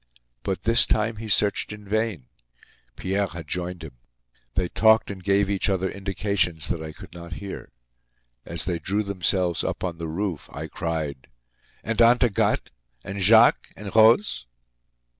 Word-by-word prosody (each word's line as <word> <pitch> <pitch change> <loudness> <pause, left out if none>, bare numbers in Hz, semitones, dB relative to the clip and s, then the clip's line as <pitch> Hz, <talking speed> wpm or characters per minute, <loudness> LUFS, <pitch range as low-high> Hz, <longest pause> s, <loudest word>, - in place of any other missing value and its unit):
But 95 -2 -3
this 115 +1 +4
time 110 +1 0
he 110 +1 -7
searched 105 0 +1
in 105 -1 -9
vain. 110 - -1 0.7
Pierre 95 +6 -1
had 85 -3 -9
joined 90 +1 -4
him. 70 -6 -11 0.6
They 90 -2 +1
talked 110 +2 +4
and 95 -2 -9
gave 100 +1 +2
each 100 0 0
other 95 -1 0
indications 95 -4 -1
that 85 - -2
I 80 0 -6
could - - -13
not 85 -1 -8
hear. 100 +3 -8 0.7
As 85 +4 -1
they 85 -2 -1
drew 100 +6 -1
themselves 90 -3 0
up - - -3
on 85 -2 -3
the 85 - -4
roof, 85 -1 -3
I 75 +2 -6
cried: 80 -5 -4 0.6
"And 115 +2 0
Aunt 120 +2 +6
Agathe? 115 -5 +1 0.3
And 100 +1 -5
Jacques? 110 +5 +6
And 105 -1 -8
Rose?" 110 - +4
95 Hz, 160 wpm, -24 LUFS, 85-105 Hz, 0.7 s, Aunt